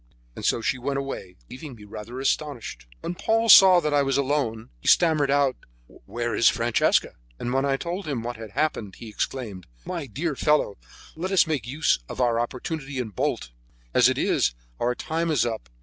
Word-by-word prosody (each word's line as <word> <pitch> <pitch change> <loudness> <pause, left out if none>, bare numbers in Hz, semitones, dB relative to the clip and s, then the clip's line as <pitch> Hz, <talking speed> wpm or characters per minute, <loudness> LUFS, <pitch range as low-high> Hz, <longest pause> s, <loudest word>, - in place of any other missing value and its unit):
And - - -8
so 115 - +1
she 130 - -1
went 140 +2 -2
away, 135 -10 -5
leaving 130 0 -9
me 105 - -14
rather 105 +4 -8
astonished. 130 - -2
When 175 - -3
Paul 225 +5 0
saw 190 -3 +9
that 150 -2 -1
I 145 - +4
was 135 -1 +1
alone, 130 - -1
he - - -10
stammered 155 -5 +4
out: 140 -2 +2 0.3
"Where; 120 - -5
is 115 - +5
Francesca?" 115 0 +1 0.2
And 120 - -3
when 135 +1 +1
I 135 -1 +1
told 175 +4 -5
him 130 -6 -2
what 120 +1 -4
had 110 -1 -8
happened, 135 -9 -1
he 115 - -10
exclaimed: 105 -5 -4 0.2
"My 170 -6 -4
dear 150 +6 -3
fellow, 150 -8 +1 0.4
let 180 +4 -4
us 195 - +5
make 145 -8 -2
use 145 +4 +1
of - - -7
our 120 -2 +2
opportunity, 135 +3 -4
and 110 -6 -4
bolt; - - -2 0.4
as - - +6
it - - -1
is, 60 - +1 0.2
our 125 +1 0
time 165 +4 -2
is 150 -6 +2
up. 110 - -4
135 Hz, 195 wpm, -25 LUFS, 115-150 Hz, 0.4 s, saw